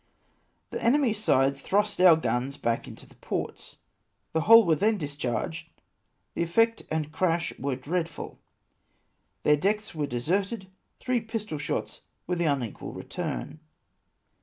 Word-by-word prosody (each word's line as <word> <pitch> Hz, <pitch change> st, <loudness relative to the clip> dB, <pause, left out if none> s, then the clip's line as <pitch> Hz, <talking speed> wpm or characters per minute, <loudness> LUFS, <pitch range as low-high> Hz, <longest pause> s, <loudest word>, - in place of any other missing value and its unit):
" -, -, -44 dB
The -, -, -4 dB
enemy's 235 Hz, -4 st, +3 dB
side 135 Hz, -6 st, +3 dB
thrust 205 Hz, +8 st, 0 dB
our 180 Hz, -3 st, +9 dB
guns 135 Hz, -3 st, -1 dB
back 115 Hz, 0 st, -1 dB
into -, -, -11 dB
the -, -, -19 dB
ports, -, -, -5 dB, 0.6 s
the 160 Hz, -, +2 dB
whole 225 Hz, +5 st, +8 dB
were 165 Hz, -2 st, +4 dB
then 215 Hz, +5 st, +2 dB
discharged, 130 Hz, -, -3 dB, 0.6 s
the -, -, -2 dB
effect 225 Hz, +7 st, +2 dB
and 155 Hz, -1 st, -2 dB
crash 170 Hz, 0 st, 0 dB
were 135 Hz, 0 st, -1 dB
dread 165 Hz, +6 st, -2 dB
ful; 160 Hz, -, -9 dB, 1.0 s
their 150 Hz, 0 st, +5 dB
decks 210 Hz, +6 st, 0 dB
were 150 Hz, -3 st, -2 dB
deserted; 190 Hz, -, -1 dB, 0.3 s
three 250 Hz, -2 st, 0 dB
pistol 215 Hz, -8 st, -4 dB
shots 145 Hz, -, -3 dB, 0.2 s
were 180 Hz, -, -1 dB
the 170 Hz, -1 st, 0 dB
unequal 135 Hz, -7 st, -2 dB
return. 155 Hz, -, -5 dB
165 Hz, 140 wpm, -27 LUFS, 140-210 Hz, 1.0 s, our